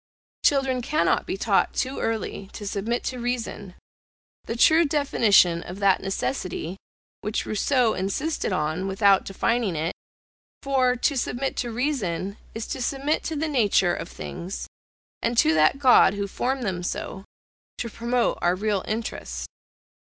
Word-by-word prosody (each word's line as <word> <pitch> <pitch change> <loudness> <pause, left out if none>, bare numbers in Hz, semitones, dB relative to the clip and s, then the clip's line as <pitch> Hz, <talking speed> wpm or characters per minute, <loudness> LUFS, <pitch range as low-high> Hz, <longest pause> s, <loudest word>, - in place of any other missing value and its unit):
Children 270 -3 +2
cannot 305 +6 +1
be - - -2
taught - - +1
too 260 +1 -1
early 220 -3 -3
to 210 - -7
submit 210 +4 -2
to 255 - -3
reason, 235 -6 -4 0.7
the 230 - -3
true 315 +7 +6
definition 225 - +3
of 180 +2 -8
that 200 -2 +3
necessity, 175 0 -3 0.5
which 210 +2 -2
Rousseau 240 +2 +2
insisted 205 - -2
on, 160 +2 -1
without 195 0 +4
defining 210 0 0
it; 160 +3 -1 0.7
for 260 -2 +2
to 265 +3 +1
submit 265 +1 -2
to 240 -1 -2
reason, 215 - -2 0.2
is 225 0 -4
to 265 - -4
submit 275 +4 0
to 320 - -2
the 310 +2 -1
nature 210 - +3
of 170 - -5
things, 180 +2 -6 0.6
and 235 +1 -1
to 160 -7 +5
that 155 - +4
God 255 -7 +6
who 200 0 -2
formed 255 +6 -2
them 185 -4 -2
so, 190 +2 -4 0.5
to 235 - -3
promote 235 +2 0
our 175 +1 +2
real 205 0 -1
interest. 225 +2 -4
225 Hz, 145 wpm, -25 LUFS, 190-255 Hz, 0.7 s, true